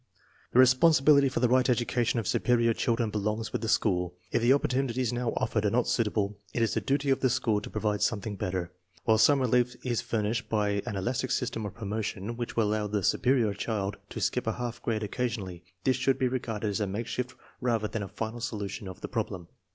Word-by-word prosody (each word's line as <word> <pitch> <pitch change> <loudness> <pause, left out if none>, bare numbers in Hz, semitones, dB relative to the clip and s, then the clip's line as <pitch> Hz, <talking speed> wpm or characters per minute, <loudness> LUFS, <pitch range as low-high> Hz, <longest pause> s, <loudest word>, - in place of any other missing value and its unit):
The - - 0
re 130 - +9
sponsibility 140 +1 +5
for~tEelpight 130 +1 +2
education 120 -1 +1
of 110 - -4
superior 120 -1 +2
children 115 -1 0
belongs 105 +2 -2
with - - -1
the 110 - -2
school. 90 -5 +1 0.2
If - - +1
the 120 +2 +4
opportunities 130 -3 +1
now 120 -1 -1
offered 110 - 0
are 105 - +3
not 120 +3 +1
suitable, 105 -3 0 0.2
it 115 - +2
is 115 - +1
the - - 0
duty 140 0 +1
of 135 - +2
the 130 - +2
school 115 -4 +1
to - - -8
provide 105 -1 -1
something 105 -1 0
better. 90 -2 -3 0.3
While 110 -1 +4
some 145 +4 +5
relief 125 0 +2
is 120 -2 0
fur 110 -2 -1
nished 115 +4 -2
by 105 -2 +1
an 105 - -3
elastic 125 +6 -1
system 115 -4 -1
of 100 - -9
promotion 105 0 -4
which 120 0 -5
will 110 -3 +2
allow 105 0 0
the 105 -1 -1
superior 120 -3 +2
child 100 -1 -2
to - - -6
skip - - -1
a - - +1
half 120 -1 -5
grade 110 -2 -1
occasion 115 0 -2
ally, 90 -2 -8 0.2
this 130 +1 +2
should 130 +1 +2
be 130 -1 +1
regarded 115 -4 -2
as 100 - -2
a 105 - 0
makeshift 120 +5 -3 0.3
rather 115 -4 +1
than 110 - -4
a 100 - -4
final 110 +4 -5
solution 100 -3 -4
of 95 - -9
the - - -4
problem. 100 -7 -4
115 Hz, 215 wpm, -29 LUFS, 105-125 Hz, 0.3 s, re